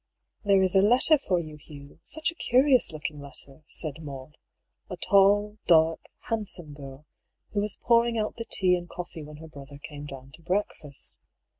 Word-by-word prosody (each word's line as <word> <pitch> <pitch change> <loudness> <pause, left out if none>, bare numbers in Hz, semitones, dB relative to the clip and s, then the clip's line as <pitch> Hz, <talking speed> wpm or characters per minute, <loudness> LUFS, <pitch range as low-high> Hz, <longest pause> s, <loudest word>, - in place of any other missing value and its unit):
" - - -47
There 195 -1 +4
is 185 +1 +3
a 190 - +7
letter 250 +8 +5
for 185 -9 0
you, 155 -2 -8
Hugh; 145 -1 -14
such 315 +2 -1
a - - -14
curious 260 - +3
looking 150 -1 -6
letter," 140 0 -11
said 155 0 -2
Maud, 140 -1 -9 0.5
a - - -6
tall, 205 +1 +3
dark, 160 -1 +4
handsome 200 -9 -3
girl, 140 0 -11 0.5
who 205 - +1
was 210 0 -3
pouring 235 0 +3
out 215 -1 -2
the 230 - -5
tea 180 -1 +4
and 175 -1 -6
coffee 175 -2 -7
when 150 0 -10
her 160 +1 -11
brother 140 -2 -12
came 145 0 -9
down 135 -1 -10
to 160 - -14
breakfast. 170 -5 -3
170 Hz, 180 wpm, -27 LUFS, 145-205 Hz, 0.5 s, a